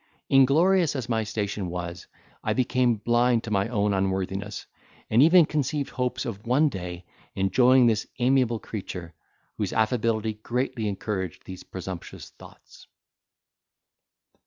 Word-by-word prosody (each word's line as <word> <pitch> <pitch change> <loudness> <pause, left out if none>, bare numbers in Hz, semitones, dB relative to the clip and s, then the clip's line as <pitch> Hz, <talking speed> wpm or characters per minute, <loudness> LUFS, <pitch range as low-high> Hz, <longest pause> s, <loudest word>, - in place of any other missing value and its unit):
Inglorious 155 +6 +4
as 130 -3 -3
my 110 -1 0
station 105 -2 -3
was, 90 0 -6 0.4
I - - 0
became 125 -1 +2
blind 120 +2 +2
to 110 - -6
my 100 -1 +1
own 105 -3 0
unworthiness, 95 +1 -2 0.5
and 115 +3 +5
even 165 +2 +7
conceived 145 -1 -2
hopes 125 -1 -2
of 105 -1 -6
one 145 +5 +3
day 90 -5 -7 0.3
enjoying 125 +7 +4
this 110 -2 +1
amiable 125 -2 +2
creature, 90 -6 -7 0.5
whose, - - -2
affability 110 -1 0
greatly 120 -2 -2
encouraged 95 -3 -4
these 95 -1 -8
presumptuous 95 -1 -8
thoughts. - - -16
110 Hz, 125 wpm, -26 LUFS, 95-125 Hz, 0.5 s, even